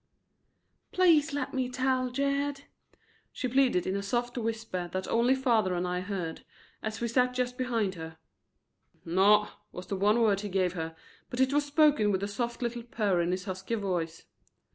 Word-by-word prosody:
"Please 320 Hz, -5 st, +4 dB
lemme 265 Hz, -2 st, -2 dB
tell, 255 Hz, 0 st, 0 dB
Jed," 280 Hz, +2 st, -1 dB, 0.7 s
she 255 Hz, -, -3 dB
pleaded 255 Hz, -7 st, +2 dB
in 190 Hz, -, -1 dB
a 200 Hz, -, -1 dB
soft 240 Hz, +4 st, -2 dB
whisper 225 Hz, -6 st, -3 dB
that 185 Hz, +1 st, -3 dB
only 240 Hz, +3 st, +3 dB
father 230 Hz, -8 st, +2 dB
and 175 Hz, +1 st, -1 dB
I 180 Hz, 0 st, -1 dB
heard, 180 Hz, -4 st, -4 dB, 0.4 s
as 220 Hz, -1 st, -4 dB
we 235 Hz, -, 0 dB
sat 250 Hz, +2 st, +2 dB
just 250 Hz, 0 st, -1 dB
behind 230 Hz, -6 st, -1 dB
her. 160 Hz, -2 st, -8 dB, 0.9 s
"Naw," 200 Hz, +5 st, +4 dB, 0.2 s
was 180 Hz, -, -8 dB
the 200 Hz, -, -3 dB
one 205 Hz, +4 st, +3 dB
word 210 Hz, -4 st, +3 dB
he 205 Hz, 0 st, -5 dB
gave 185 Hz, -2 st, +1 dB
her, 160 Hz, -2 st, -5 dB, 0.3 s
but 245 Hz, -, -5 dB
it 265 Hz, +1 st, +3 dB
was 290 Hz, 0 st, +2 dB
spoken 290 Hz, -7 st, +4 dB
with 190 Hz, 0 st, -1 dB
a -, -, 0 dB
soft 235 Hz, +4 st, -3 dB
little 240 Hz, 0 st, -2 dB
purr 210 Hz, -6 st, 0 dB
in 170 Hz, -, 0 dB
his 185 Hz, +1 st, -2 dB
husky 190 Hz, +3 st, -3 dB
voice. 175 Hz, -6 st, -3 dB
225 Hz, 175 wpm, -29 LUFS, 185-255 Hz, 0.9 s, Please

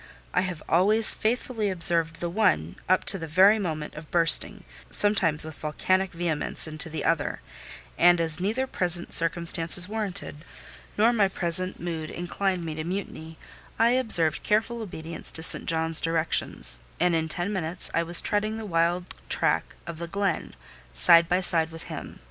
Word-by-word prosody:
I 180 Hz, -, +2 dB
have 180 Hz, -4 st, -6 dB
always 210 Hz, +6 st, +4 dB
faithfully 225 Hz, -1 st, -2 dB
observed 165 Hz, -2 st, +1 dB
the 175 Hz, -, -3 dB
one, 85 Hz, -, 0 dB
up 185 Hz, -, +2 dB
to 195 Hz, -, +5 dB
the 165 Hz, -, -7 dB
very 190 Hz, +7 st, +4 dB
moment 155 Hz, -6 st, -5 dB
of 150 Hz, 0 st, -11 dB
bursting, 165 Hz, -1 st, +3 dB, 0.3 s
sometimes 175 Hz, -7 st, +5 dB
with 160 Hz, -, -8 dB
volcanic 185 Hz, +6 st, -2 dB
vehemence, 165 Hz, -3 st, +1 dB
into 155 Hz, +1 st, -5 dB
the 160 Hz, -, -5 dB
other; 165 Hz, -3 st, -1 dB, 0.6 s
and 175 Hz, 0 st, +5 dB
as 160 Hz, -1 st, +1 dB
neither 220 Hz, +8 st, -2 dB
present 175 Hz, -7 st, -2 dB
circumstances 170 Hz, +1 st, +2 dB
warranted, 205 Hz, -7 st, -4 dB, 0.6 s
nor 225 Hz, +3 st, +3 dB
my 210 Hz, -4 st, +2 dB
present 185 Hz, 0 st, 0 dB
mood 165 Hz, -2 st, -5 dB
inclined 180 Hz, 0 st, -3 dB
me 160 Hz, -, -5 dB
to 155 Hz, 0 st, -6 dB
mutiny, 165 Hz, -3 st, -7 dB, 0.4 s
I 230 Hz, +1 st, +3 dB
observed 220 Hz, -, +2 dB
careful 225 Hz, +2 st, -1 dB
obedience 170 Hz, -5 st, -6 dB
to 160 Hz, -, -1 dB
St. -, -, +4 dB
John's 160 Hz, -1 st, -1 dB
directions; 165 Hz, -, -3 dB, 0.2 s
and 175 Hz, 0 st, +1 dB
in 160 Hz, -1 st, -1 dB
ten 180 Hz, +5 st, -1 dB
minutes 180 Hz, -1 st, -2 dB
I 165 Hz, -, +1 dB
was 170 Hz, +1 st, +1 dB
treading 215 Hz, +1 st, -2 dB
the 225 Hz, -, -7 dB
wild 175 Hz, -1 st, -1 dB, 0.2 s
track -, -, -1 dB
of 170 Hz, -1 st, -8 dB
the 170 Hz, -, -6 dB
glen, 195 Hz, -1 st, -3 dB, 0.4 s
side 165 Hz, -, +6 dB
by 180 Hz, +1 st, +1 dB
side 165 Hz, -3 st, +2 dB
with 165 Hz, 0 st, -10 dB
him. -, -, -9 dB
175 Hz, 165 wpm, -25 LUFS, 165-195 Hz, 0.6 s, side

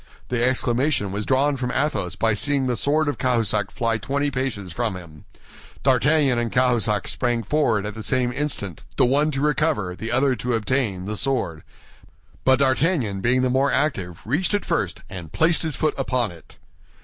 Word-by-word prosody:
The 125 Hz, -1 st, 0 dB
exclamation 125 Hz, -3 st, +1 dB
was 100 Hz, +2 st, -4 dB
drawn 140 Hz, +2 st, +2 dB
from 125 Hz, -1 st, -2 dB
Athos 130 Hz, -, -1 dB
by 115 Hz, -1 st, +1 dB
seeing 140 Hz, +5 st, 0 dB
the 125 Hz, -1 st, 0 dB
sword 150 Hz, +6 st, +1 dB
of 145 Hz, -, -2 dB
Cahusac 110 Hz, -6 st, +1 dB
fly 115 Hz, -2 st, -1 dB
twenty 140 Hz, +5 st, -1 dB
paces 125 Hz, -8 st, -2 dB
from 115 Hz, 0 st, -2 dB
him. 80 Hz, -5 st, -11 dB, 0.6 s
D'Artagnan 135 Hz, 0 st, +3 dB
and 120 Hz, -2 st, -2 dB
Cahusac 120 Hz, -5 st, +1 dB
sprang 120 Hz, -2 st, -1 dB
forward 115 Hz, -9 st, +1 dB
at 105 Hz, -, -4 dB
the 110 Hz, -, -7 dB
same 125 Hz, +1 st, +1 dB
instant, 120 Hz, -, -3 dB, 0.2 s
the -, -, +5 dB
one 145 Hz, +5 st, +2 dB
to 135 Hz, -2 st, -2 dB
recover, 150 Hz, -, 0 dB
the 110 Hz, +4 st, -5 dB
other 130 Hz, +1 st, +2 dB
to 125 Hz, -1 st, -1 dB
obtain, 110 Hz, -4 st, -1 dB
the 105 Hz, +2 st, -3 dB
sword; 115 Hz, -, -1 dB, 0.8 s
but 130 Hz, 0 st, +5 dB
D'Artagnan, 135 Hz, -, +1 dB
being 125 Hz, +4 st, +2 dB
the 130 Hz, -, +1 dB
more 135 Hz, +1 st, +2 dB
active, 100 Hz, -, -1 dB
reached 165 Hz, -, +1 dB
it 205 Hz, -, -2 dB
first -, -, -1 dB
and 90 Hz, -5 st, -8 dB
placed 165 Hz, +1 st, +2 dB
his 160 Hz, -4 st, -2 dB
foot 155 Hz, -, 0 dB
upon 125 Hz, -5 st, 0 dB
it. 80 Hz, -4 st, -16 dB
125 Hz, 180 wpm, -23 LUFS, 105-140 Hz, 0.8 s, the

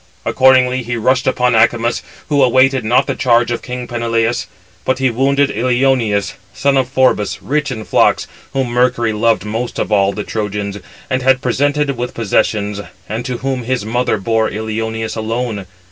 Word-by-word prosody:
Accordingly 130 Hz, -1 st, +4 dB
he 120 Hz, 0 st, -3 dB
rushed 130 Hz, +4 st, +1 dB
upon 125 Hz, -1 st, +2 dB
Acamas, 115 Hz, +1 st, +2 dB, 0.3 s
who 145 Hz, -2 st, +2 dB
awaited 130 Hz, +1 st, +3 dB
not 125 Hz, +5 st, +3 dB
the -, -, -1 dB
charge 120 Hz, -3 st, +2 dB
of 120 Hz, -, -2 dB
king 125 Hz, 0 st, -6 dB
Peneleus; 115 Hz, -1 st, -1 dB, 0.4 s
but 130 Hz, -, 0 dB
he 130 Hz, -1 st, +1 dB
wounded 140 Hz, +3 st, +2 dB
Ilioneus, 120 Hz, -3 st, +1 dB, 0.2 s
son 140 Hz, 0 st, +1 dB
of 130 Hz, -2 st, +1 dB
Phorbas, 130 Hz, -6 st, +1 dB
rich 145 Hz, +6 st, -1 dB
in 110 Hz, -4 st, -5 dB
flocks, -, -, +2 dB, 0.3 s
whom 135 Hz, -2 st, -1 dB
Mercury 120 Hz, -2 st, +1 dB
loved 105 Hz, -3 st, +1 dB
most 115 Hz, +3 st, -4 dB
of -, -, -2 dB
all 100 Hz, -1 st, +3 dB
the 105 Hz, -, -5 dB
Trojans, 105 Hz, -2 st, -4 dB, 0.3 s
and 130 Hz, 0 st, -1 dB
had 130 Hz, 0 st, +3 dB
presented 145 Hz, +3 st, 0 dB
with 125 Hz, +1 st, -4 dB
possessions; 105 Hz, -2 st, 0 dB, 0.3 s
and 110 Hz, +3 st, -4 dB
to 125 Hz, -2 st, -3 dB
whom 135 Hz, -2 st, -1 dB
his 125 Hz, -2 st, -2 dB
mother 120 Hz, +1 st, 0 dB
bore 110 Hz, +2 st, 0 dB
Ilioneus 110 Hz, +1 st, -3 dB
alone. 110 Hz, -3 st, -3 dB
120 Hz, 165 wpm, -16 LUFS, 110-130 Hz, 0.4 s, Accordingly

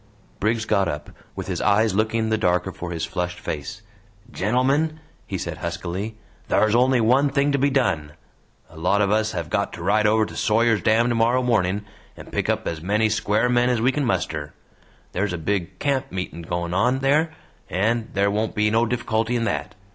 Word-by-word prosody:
Briggs 110 Hz, +1 st, 0 dB
got 100 Hz, -4 st, +2 dB
up, 75 Hz, -3 st, -5 dB, 0.2 s
with -, -, -5 dB
his -, -, -3 dB
eyes 105 Hz, +1 st, +3 dB
looking 110 Hz, +2 st, +1 dB
the 110 Hz, -, +2 dB
darker 90 Hz, -1 st, +1 dB
for 85 Hz, 0 st, -7 dB
his 85 Hz, -1 st, -3 dB
flushed 90 Hz, 0 st, -3 dB
face. 90 Hz, +7 st, -5 dB, 0.5 s
"Gentlemen," 135 Hz, +10 st, +1 dB, 0.3 s
he -, -, -3 dB
said -, -, -5 dB
huskily, 100 Hz, +6 st, -4 dB, 0.3 s
"thar's 110 Hz, 0 st, +3 dB
only 125 Hz, +1 st, +4 dB
one 130 Hz, +6 st, +4 dB
thing 140 Hz, +1 st, +1 dB
to 140 Hz, -, +1 dB
be 140 Hz, +2 st, +3 dB
done. 80 Hz, -, 0 dB, 0.6 s
A 80 Hz, -, -14 dB
lot 100 Hz, +5 st, +2 dB
of 100 Hz, -, +1 dB
us 110 Hz, +1 st, +1 dB
have 85 Hz, -4 st, -4 dB
got -, -, 0 dB
to -, -, -7 dB
ride 105 Hz, +1 st, +3 dB
over 110 Hz, +1 st, +3 dB
to -, -, -10 dB
Sawyer's 115 Hz, 0 st, +2 dB
Dam 115 Hz, +2 st, +3 dB
tomorrow 120 Hz, +2 st, +2 dB
morning 105 Hz, -4 st, +1 dB, 0.3 s
and -, -, -11 dB
pick -, -, -1 dB
up -, -, 0 dB
as 80 Hz, -2 st, -3 dB
many 105 Hz, +5 st, +1 dB
square 110 Hz, +2 st, +1 dB
men 125 Hz, 0 st, +3 dB
as 125 Hz, -2 st, +1 dB
we 125 Hz, +4 st, +3 dB
can 145 Hz, +1 st, -1 dB
muster; 80 Hz, -, -2 dB, 0.6 s
there's 100 Hz, +1 st, -1 dB
a -, -, -2 dB
big 85 Hz, +1 st, -2 dB
camp 140 Hz, -2 st, -1 dB
meeting 90 Hz, -2 st, -5 dB
goin' 85 Hz, +1 st, -3 dB
on 125 Hz, +8 st, +2 dB
there, 150 Hz, +4 st, +2 dB, 0.4 s
and 110 Hz, +5 st, 0 dB
there 100 Hz, +1 st, +2 dB
won't 110 Hz, +2 st, -1 dB
be 105 Hz, 0 st, +2 dB
no 115 Hz, +1 st, +3 dB
difficulty 115 Hz, 0 st, -1 dB
in 115 Hz, -, 0 dB
that. 105 Hz, -1 st, -2 dB
110 Hz, 195 wpm, -23 LUFS, 95-120 Hz, 0.6 s, only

